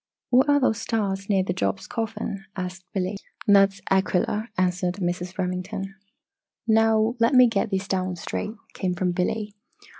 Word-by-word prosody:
"What 260 +4 +5
are 285 0 +5
those 225 -5 +1
stars 200 -4 -2
near 195 -2 +3
Job's 185 +2 -1
Coffin?" 210 -3 -4
asked 185 -1 -5
Billy. 190 +1 -2 0.3
"That 200 -1 +6
is 195 - -16
Aquilla," 195 +3 +1
answered 180 -1 +1
Mrs. 180 -1 -3
Remington. 185 +2 -3 0.7
"Now 220 0 +4
let 230 +4 +3
me 255 0 +9
get 215 -4 0
these 190 0 -2
down 185 -2 -1
straight," 210 +5 -4 0.2
came 180 -2 -2
from 180 0 0
Billy. 205 +4 -1
195 Hz, 150 wpm, -25 LUFS, 185-220 Hz, 0.7 s, me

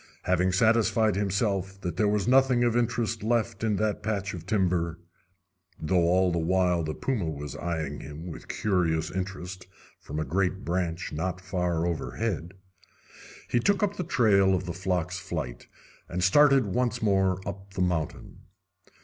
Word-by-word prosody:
Having 90 0 +2
satisfied 110 0 +3
himself 100 -1 -1
that 90 -4 -3
there 105 +3 +2
was 105 0 +1
nothing 130 -1 +4
of 120 -1 +2
interest 115 -1 0
left 115 -1 0
in 110 -2 +2
that 105 +1 -1
patch 105 -2 -2
of 85 0 -8
timber 90 -5 +1 0.8
though 85 +2 +2
all 90 +1 +3
the 85 - 0
while 90 +1 +2
the 75 0 -3
puma 110 -11 -1
was 75 -2 -6
eyeing 80 -4 -3
him 75 +4 -8
with 85 - -8
curious 80 -6 0
interest 95 0 -5 0.3
from 75 +2 -6
a 80 - -1
great 95 +5 -1
branch 85 0 -2
not 90 +4 -2
far 90 -3 -1
overhead 85 +1 -3 0.9
he 120 - +1
took 200 - +2
up 205 0 +1
the 180 - -1
trail 105 - +4
of 90 0 -3
the 85 - -4
flock's 90 -1 -2
flight, - - -5 0.4
and 90 0 -2
started 135 +5 +5
once 120 -2 0
more 95 -3 +2
up 95 0 -7
the 90 - -1
mountain. 85 -4 -2
95 Hz, 160 wpm, -27 LUFS, 85-110 Hz, 0.9 s, started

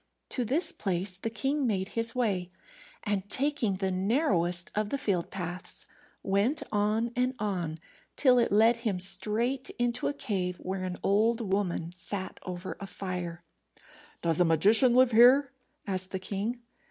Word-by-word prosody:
To 250 - -1
this 275 +10 +1
place 185 -1 -2
the 195 +4 -4
king 270 +4 -1
made 190 -3 -1
his 230 +1 0
way, 195 -8 0 0.5
and 205 -2 -2
taking 265 -7 +1
the 190 0 -1
narrowest 185 - 0
of 210 0 -1
the 280 - -1
field 195 -9 -1
paths, 180 -1 -6 0.4
went 205 +10 +1
on 215 +3 0
and 250 +1 0
on 180 -6 -3 0.4
till 255 -3 +4
it 235 - +1
led 225 +3 +5
him 220 -6 -2
straight 215 +8 +2
into 240 0 0
a - - -1
cave, 185 -9 -2
where 185 +1 -4
an 180 -1 -4
old 220 +4 +2
woman 190 -5 -2
sat 185 +2 -5
over 180 +1 -6
a 200 - -7
fire. 180 -3 -5 0.8
"Does 165 -1 +2
a - - +6
magician 210 - +5
live 255 -1 +5
here?" 250 +4 +6 0.3
asked 185 -2 -3
the 190 - -3
king. 205 +6 -4
205 Hz, 155 wpm, -29 LUFS, 185-240 Hz, 0.8 s, a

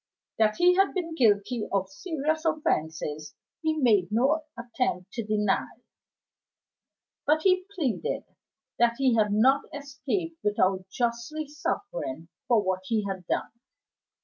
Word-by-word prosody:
That 215 -1 +4
he 355 +1 +5
had 390 +1 +3
been 335 -3 -2
guilty 220 -3 +2
of 195 -1 +1
serious 315 - -2
offenses 160 - -1 0.3
he 315 -1 0
made 215 -9 +3
no 275 +8 +2
attempt 235 -6 -2
to 230 - -3
deny; 210 -2 +1 1.6
but 310 +1 +3
he 370 -1 +3
pleaded 320 - -1 0.6
that 235 0 +4
he 265 -3 +3
had 215 -2 +3
not 260 +7 +4
escaped 290 +4 -4
without 190 -2 +1
justly 240 +8 -2
suffering 285 - -4 0.2
for 230 -4 +4
what 185 -1 0
he 215 -1 0
had 190 -3 -5
done. - - -1
235 Hz, 125 wpm, -27 LUFS, 205-310 Hz, 1.6 s, he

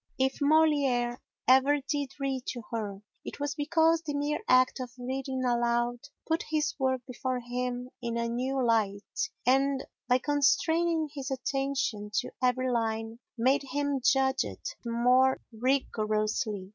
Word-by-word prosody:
If 265 +1 0
Molière 285 -5 +3 0.3
ever 265 +3 +5
did 285 -2 -3
read 270 -2 -2
to 240 -2 -4
her, 210 -3 -4 0.2
it - - -8
was 290 +1 -1
because 320 +2 +2
the 300 -3 -4
mere 290 +1 -1
act 255 +1 +4
of 255 -1 -4
reading 260 +1 -3
aloud 240 0 +1 0.3
put 325 +1 0
his 305 -1 0
work 260 -1 +1
before 255 0 -3
him 250 +1 -4
in 235 -1 -2
a 235 0 0
new 255 +2 -1
light 210 -3 0 0.3
and, 270 +2 +3 0.2
by 250 0 +4
constraining 310 +4 +2
his 275 -3 -5
attention 265 -5 -2
to - - 0
every 255 0 +1
line, 225 -1 -2 0.2
made 260 +5 +3
him 280 0 -2
judge 265 0 +3
it - - -6
more 250 +3 +3
rigorously. 215 -4 -1
255 Hz, 140 wpm, -29 LUFS, 240-280 Hz, 0.3 s, ever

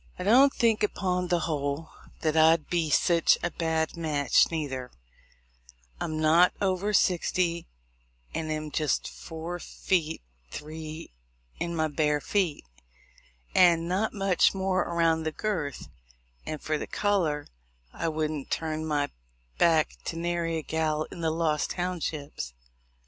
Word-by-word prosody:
And 180 - -4
I - - +5
don't 270 +3 +7
think, 225 -2 +2
upon 180 -3 0
the 175 -1 +1
whole, 150 0 -2 0.3
that 155 -1 +1
I'd 160 0 +4
be 170 -3 +1
sich 170 +2 +4
a 175 - 0
bad 160 -1 -1
match 150 -4 +3
neither: 135 -6 -3 1.1
I'm 155 0 -3
not 165 +3 +5
over 195 +1 0
sixty, 175 -3 +1 0.7
and 155 -1 -3
am 155 0 -3
jist 150 -3 0
four 165 +2 -7
feet 165 - -1 0.3
three 155 - -7 0.5
in 170 0 -2
my 160 -1 +1
bare 150 -1 +1
feet, 175 - -1 0.9
and 170 -2 +5
not 195 +5 0
much 195 -2 +2
more 190 -1 0
around 165 -1 +1
the 160 0 -2
girth; 160 - -3 0.6
and 155 - -3
for 155 +1 -2
color, 175 -8 0 0.5
I - - -2
wouldn't 155 -2 -2
turn 155 -1 -2
my 145 -2 0 0.5
back 160 -2 +3
to - - -3
nary 170 -1 -1
a 160 - -4
gal 155 -1 0
in 170 - -8
the 160 - +1
Lost 160 -2 0
Townships. 155 - -4
160 Hz, 135 wpm, -28 LUFS, 155-175 Hz, 1.1 s, don't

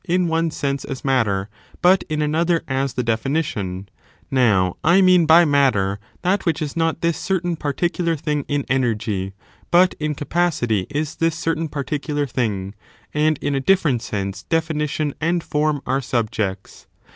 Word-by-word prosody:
in 180 -1 +1
QQg 165 0 0
sense 140 -2 -2
as 135 0 -7
matter, 105 -8 +1 0.3
but 185 +1 +4
in 155 -1 0
another 165 +3 +1
as 135 -1 -1
the 125 - 0
definition; 110 - -2 0.4
now, 105 -9 +3
I 170 +4 +5
mean 180 -3 +5
by 170 +2 +7
matter 125 -10 +2 0.2
that 190 +3 +1
which 165 -4 0
is 150 -3 -4
not 165 0 0
this 170 -2 +1
I - - -6
certain 175 -3 0
paHiicular 165 +2 -1
thing 150 -1 -1
in 145 -1 -1
energy, 105 -7 -1 0.4
but 180 +1 +5
in 150 -1 -1
capacity 140 - 0
is 150 +2 -3
this 165 -1 +1
j 160 - -7
certain 165 0 0
particular 145 +1 -2
thing; 105 -7 -2 0.4
and 155 0 +2
in 145 - 0
a 135 - 0
difierent 150 -7 +2
sense 95 -3 -4
definition 155 - -1
I 160 - 0
and 170 0 +1
form 150 -1 0
are 135 +2 0
subjects. 110 -6 -3
145 Hz, 165 wpm, -21 LUFS, 120-165 Hz, 0.4 s, by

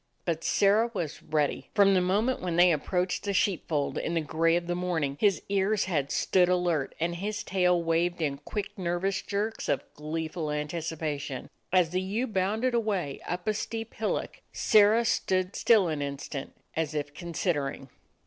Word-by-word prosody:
But 165 -2 -1
Sirrah 210 +4 +3
was 160 -5 -3
ready. 150 -2 -1
From 200 -2 +6
the 185 - +4
moment 210 +8 +1
when 175 -2 -2
they 175 +1 +6
approached 180 +4 0
the 200 -1 -1
sheep 190 -2 +1
fold 145 -3 -1
in 170 - -2
the - - +3
gray 165 +2 +2
of 175 0 0
the 175 - -1
morning, 170 -6 -1
his 200 -4 +2
ears 200 +1 +1
had 150 -7 -1
stood 180 -1 +3
alert, 175 -6 0
and 170 +1 -1
his 205 +3 -3
tail 180 -2 +2
waved 170 +2 +1
in 140 -4 -1
quick, 205 +7 -5
nervous 180 +2 -1
jerks 210 +2 -3
of - - +1
gleeful 155 +1 -4
anticipation. 150 -2 -3 0.2
As 180 -3 +3
the 185 +1 0
ewe 205 +7 -1
bounded 220 +4 0
away 200 -11 -1
up 180 +2 -4
a 215 - +3
steep 225 +1 -4
hillock, 220 - -3
Sirrah 215 +2 +4
stood 185 -5 0
still 215 -6 +4
an 155 -3 -2
instant, 140 0 -5 0.2
as 160 -1 -1
if 145 -1 -3
considering. 150 -5 -2
175 Hz, 170 wpm, -28 LUFS, 155-200 Hz, 0.2 s, From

